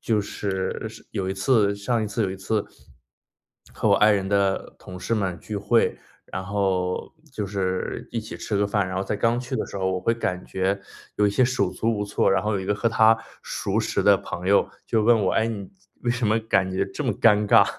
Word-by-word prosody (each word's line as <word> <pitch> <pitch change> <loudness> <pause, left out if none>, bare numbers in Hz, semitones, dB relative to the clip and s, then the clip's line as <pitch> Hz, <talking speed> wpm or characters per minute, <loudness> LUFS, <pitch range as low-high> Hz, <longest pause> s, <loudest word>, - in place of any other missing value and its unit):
就 110 -2 +1
是 100 +1 -3
是 110 +1 -14
有 95 -3 -2
一 - - 0
次 100 0 +3
上 110 +2 0
一 - - -1
次 105 +2 -1
有 95 - -1
一 95 - -5
次， 105 +2 -1 1.1
和 - - 0
我 - - +6
爱 105 0 +5
人 95 -2 +1
的 100 -1 0
同 90 0 -10
事 115 - -1
们 95 -5 -1
聚 105 - -6
会， 105 +3 +2 0.3
然 95 +1 -6
后 95 -2 -1 0.2
就 105 -5 -3
是 95 -2 -3
一 115 - -2
起 110 - -8
吃 105 - -3
个 100 0 +2
饭。 100 -2 0
然 95 - -4
后 95 - 0
在 105 - -2
刚 115 +3 +2
去 125 +1 -5
的 - - -1
时 - - -8
候 95 0 0
我 95 - -2
会 115 - +2
感 90 -6 -2
觉， 95 +1 -1 0.3
有 105 - +2
一 - - +2
些 125 +5 +3
手 125 0 +1
足 115 -1 -1
无 105 - -1
措， 100 - +1
然 95 - +2
后 105 0 0
有 95 - -1
一 - - -5
个 105 +1 +1
和 115 +3 +1
她 110 0 +5 0.3
熟 - - -2
识 - - 0
的 - - +6
朋 90 +2 -5
友 100 - +4 0.2
就 110 -1 +1
问 115 -2 +5
我： - - +2
“哎， 110 0 +2
你 105 -4 -5 0.3
为 120 - +1
什 120 -2 0
么 110 +2 +3
感 95 -4 +1
觉 95 +1 +1
这 140 +9 -5
么 125 - +1
尴 105 -1 +4
尬？” - - +7
100 Hz, 255 characters per minute, -24 LUFS, 95-110 Hz, 1.1 s, 尬